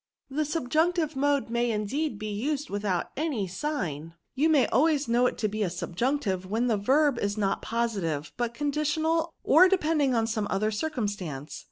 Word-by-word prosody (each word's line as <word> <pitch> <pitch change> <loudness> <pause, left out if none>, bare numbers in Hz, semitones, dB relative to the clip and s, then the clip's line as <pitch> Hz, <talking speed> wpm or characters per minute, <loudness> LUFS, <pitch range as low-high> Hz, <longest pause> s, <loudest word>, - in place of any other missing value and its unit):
'" - - -66
The 305 +3 0
subjunctive 315 +2 0
mode 280 -2 +1
may 240 0 +1
indeed 225 +5 -1
be 215 0 -5
used 285 +7 -2
withoi^t 200 -3 -1
any 285 -9 -1
sign; 175 - -4 0.2
you 295 +5 +2
may 295 -5 +5
always 295 0 +2
know 240 +2 +3
it - - -3
to 215 - 0
be 215 +1 -4
subjunctive 190 +3 -1
when 225 +5 0
the 235 -3 +2
verb 265 +5 +2
is 205 +1 -1
not 195 -2 0
positive, 195 -11 -2
but 235 -1 -2
conditional 305 +3 0
or 360 +6 +6
depending 305 -8 +2
on 225 -1 +2
some 220 -2 -1
other 215 +2 0
circumstance. 205 - -4
240 Hz, 170 wpm, -27 LUFS, 205-300 Hz, 0.2 s, or